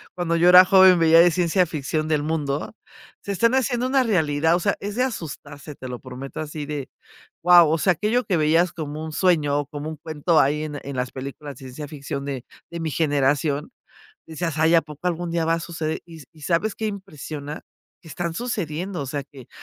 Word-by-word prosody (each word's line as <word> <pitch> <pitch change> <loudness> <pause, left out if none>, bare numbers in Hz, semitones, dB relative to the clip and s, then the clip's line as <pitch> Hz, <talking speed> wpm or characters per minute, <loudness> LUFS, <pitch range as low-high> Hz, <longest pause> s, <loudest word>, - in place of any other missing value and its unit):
cuando 170 -2 -1
yo 175 +2 +4
era 180 +1 +10
joven 190 -1 +7
veía 165 0 +6
de 175 0 +6
ciencia 180 +2 +2
ficción 155 0 -3
del 150 -2 0
mundo, 150 +1 -2 0.5
se 200 - -5
están 230 +6 +2
haciendo 250 -1 0
una 265 0 +3
realidad, 160 -6 +2
o - - 0
sea, 200 - +1
es 205 +1 -5
de 250 - +2
asustarse, 150 - -6
te 130 - -9
lo 125 -1 -6
prometo 130 +1 -8
así 155 -1 -5
de, 145 -2 -5 0.6
¡guau!, 175 -3 +7
o 160 - +2
sea, 185 +4 +2
aquello 215 +8 0
que 180 -5 +1
veías 165 +3 +3
como 155 -1 -6
un 160 - -6
sueño 150 -5 +2
o 145 - -3
como 145 +1 -6
un 160 - -7
cuento 155 +2 0
ahí 150 +3 +2
en 150 -2 -5
en 140 -1 -6
las 125 0 -2
películas 140 +1 -7
de - - -15
ciencia 135 +3 -8
ficción 140 -1 -5
de 135 -3 -5 0.3
de 170 - -5
mi 160 - -2
generación, 145 -1 0 0.6
decías: 160 -1 -4
"Ay, 160 +1 +4
a 165 - +5
poco 150 +3 -6
algún 175 0 -2
día 165 -1 0
va 165 - +2
a - - -4
suceder", 160 -2 -4
y 165 -3 -12
y, 155 - -18
¿sabes 170 +8 0
qué 220 - -3
impresiona?, 155 -6 -7 0.4
que 165 - -14
están 170 +3 -4
sucediendo. 185 -6 -4
O 140 - -4
sea, 140 0 -3
que 135 -3 -15
160 Hz, 215 wpm, -23 LUFS, 145-175 Hz, 0.6 s, era